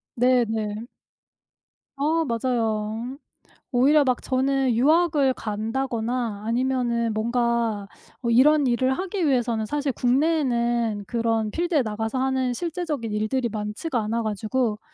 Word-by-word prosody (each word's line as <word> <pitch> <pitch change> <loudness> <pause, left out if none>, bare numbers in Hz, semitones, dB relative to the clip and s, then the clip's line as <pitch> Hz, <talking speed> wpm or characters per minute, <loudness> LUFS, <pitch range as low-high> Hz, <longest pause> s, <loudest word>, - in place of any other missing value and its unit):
네 250 0 +3
네. 215 -1 -2 1.2
아 315 +4 +1
맞아요. 230 0 -1 0.5
오히려 280 +4 +4
막 255 -2 +1
저는 265 -1 +1
유학을 295 +1 +3
간다거나 225 0 -3
아니면은 235 -1 0
뭔가 235 -2 0 0.3
어 235 - -1
이런 280 +4 +5
일을 255 +2 +2
하기 370 +2 -2
위해서는 240 -5 +1
사실 285 +4 -1
국내에는 240 -6 +1
그런 225 -2 0
필드에 340 -4 +1
나가서 220 +2 -3
하는 260 -1 0
실제적인 315 -6 -3
일들이 215 +4 -1
많지가 215 +6 -3
않아 230 +2 -1
가지고 215 +1 -1
245 Hz, 270 characters per minute, -24 LUFS, 225-270 Hz, 1.2 s, 이런